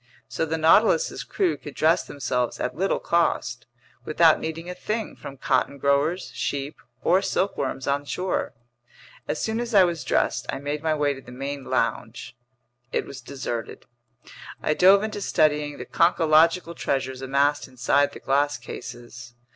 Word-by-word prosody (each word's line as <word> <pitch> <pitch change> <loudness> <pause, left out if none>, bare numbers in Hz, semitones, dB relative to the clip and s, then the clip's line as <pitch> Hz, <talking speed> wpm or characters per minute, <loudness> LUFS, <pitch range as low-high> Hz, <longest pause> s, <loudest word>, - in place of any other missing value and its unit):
So 160 - -2
the 160 +1 -1
Nautilus's 210 - +3
crew 375 -4 0
could 145 - -10
dress 165 +3 +3
themselves 125 -3 -2
at - - -2
little 195 +4 0
cost, 120 -8 0 0.4
without 160 +1 +4
needing 165 +1 -5
a 180 - -4
thing 215 +5 -4
from 140 - -10
cotton 140 - 0
growers, 140 +6 +1
sheep, 140 +1 -3 0.3
or 185 +3 +4
silkworms 140 -9 -1
on 140 +1 0
shore. 180 -1 -2 0.7
As - - -2
soon 220 +1 -1
as 235 -2 -3
I 195 - +8
was 170 -3 -1
dressed, - - 0
I - - -2
made 145 +2 -4
my 160 -1 +1
way 145 -1 +1
to 135 - -11
the 125 - -13
main 135 +2 -5
lounge. 120 -2 -2 0.6
It - - -1
was 135 - -9
deserted. 120 -3 -6 0.8
I 155 - +2
dove 195 +5 +6
into 215 -1 -4
studying 150 -5 +1
the - - -7
conchological 165 0 +3
treasures 130 -1 -2
amassed 140 +3 +1
inside 135 +3 +1
the - - -9
glass 145 +1 +1
cases. 120 0 -9
145 Hz, 155 wpm, -24 LUFS, 135-170 Hz, 0.8 s, I